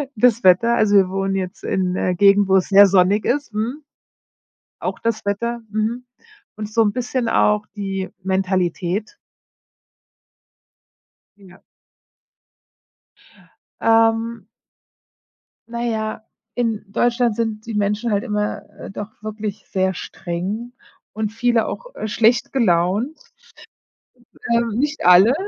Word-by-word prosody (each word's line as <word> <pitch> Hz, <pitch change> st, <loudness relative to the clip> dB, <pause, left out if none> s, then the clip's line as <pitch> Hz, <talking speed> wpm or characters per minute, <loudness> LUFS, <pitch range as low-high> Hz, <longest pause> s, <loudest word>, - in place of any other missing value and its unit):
Das 235 Hz, 0 st, +3 dB
Wetter 190 Hz, +6 st, +5 dB
also 210 Hz, -3 st, +3 dB
wir 190 Hz, -2 st, +5 dB
wohnen 195 Hz, 0 st, -1 dB
jetzt 185 Hz, -2 st, -4 dB
in 185 Hz, -1 st, -1 dB
'ner 185 Hz, 0 st, 0 dB
Gegend, 200 Hz, +2 st, +5 dB
wo 190 Hz, 0 st, +4 dB
es 185 Hz, -, 0 dB
sehr 200 Hz, 0 st, +8 dB
sonnig 195 Hz, +2 st, +3 dB
ist, 285 Hz, -2 st, -1 dB
mhm 235 Hz, +8 st, -3 dB, 1.0 s
auch -, -, -4 dB
das 225 Hz, -2 st, -2 dB
Wetter, 235 Hz, +4 st, -2 dB
mhm. 220 Hz, +4 st, -2 dB, 0.5 s
Und 215 Hz, 0 st, -6 dB
so 225 Hz, -, +3 dB
'n 205 Hz, -, +1 dB
bisschen 250 Hz, -1 st, -2 dB
auch 210 Hz, -1 st, +2 dB
die 195 Hz, -2 st, -4 dB
Mentalität. 190 Hz, +1 st, -1 dB, 2.2 s
Ja. 190 Hz, -2 st, -17 dB, 2.2 s
Ähm 225 Hz, +1 st, +2 dB, 1.2 s
Na 235 Hz, 0 st, -4 dB
ja, 220 Hz, -2 st, -2 dB, 0.3 s
in 230 Hz, -4 st, -1 dB
Deutschland 240 Hz, +1 st, +1 dB
sind 220 Hz, -2 st, -3 dB
die 230 Hz, -, -5 dB
Menschen 210 Hz, +3 st, 0 dB
halt 205 Hz, 0 st, +1 dB
immer, 210 Hz, -3 st, -2 dB, 0.2 s
äh, -, -, -8 dB
doch 205 Hz, +1 st, -7 dB
wirklich 215 Hz, -1 st, -6 dB
sehr 190 Hz, 0 st, 0 dB
streng 190 Hz, +9 st, -5 dB, 0.4 s
und 215 Hz, 0 st, -2 dB
viele 230 Hz, 0 st, +1 dB
auch, -, -, -7 dB
äh, -, -, -4 dB
schlecht 225 Hz, +2 st, +2 dB
gelaunt 210 Hz, -, +1 dB, 1.3 s
und, -, -, +4 dB, 0.2 s
ähm, -, -, -3 dB
nicht 295 Hz, -, -1 dB
alle, 180 Hz, +7 st, +7 dB
215 Hz, 120 wpm, -20 LUFS, 195-230 Hz, 2.2 s, sehr